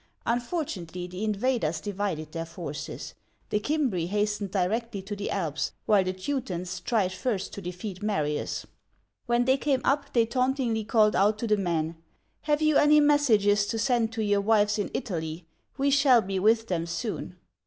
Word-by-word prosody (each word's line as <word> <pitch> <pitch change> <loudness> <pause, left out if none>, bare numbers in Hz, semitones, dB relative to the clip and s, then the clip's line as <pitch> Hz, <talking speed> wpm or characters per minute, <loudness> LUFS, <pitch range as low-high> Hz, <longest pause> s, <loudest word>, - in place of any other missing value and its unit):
Fortunately, 180 - -4
the 180 +3 -6
invaders 215 -6 0
divided 185 -5 -3
their 165 0 -4
forces: 165 -3 -6 0.4
the 210 - +2
Cimbri 260 - 0
hastened 210 +1 -1
directly 205 +4 -1
to 205 +2 -5
the 200 0 -4
Alps, 155 -6 -2
while 205 -3 +4
the 185 - -1
Teutons 185 -4 -4
tried 210 -6 0
first 195 -1 -2
to 200 - -6
defeat 180 +2 -6
Marius. 155 -8 -1 0.6
When 240 0 +2
they 260 +1 +4
came 275 -2 0
up, 280 +1 +1
they 235 -2 +4
tauntingly 250 -2 0
called 215 -1 +3
out 205 +3 +3
to 235 - -3
the 215 -2 +3
men: 170 -4 -1 0.5
"Have 295 +1 +3
you 310 -1 +4
any 300 +1 +6
messages 220 -9 +4
to 225 - -2
send 230 -1 +1
to 225 -1 -1
your 205 -1 +2
wives 210 0 +3
in 205 - -1
Italy? 165 -8 -4 0.3
We 280 0 +2
shall 270 -5 +5
be 190 0 -2
with 225 +3 +3
them 170 -4 -1
soon 185 0 -4
210 Hz, 165 wpm, -27 LUFS, 185-240 Hz, 0.6 s, any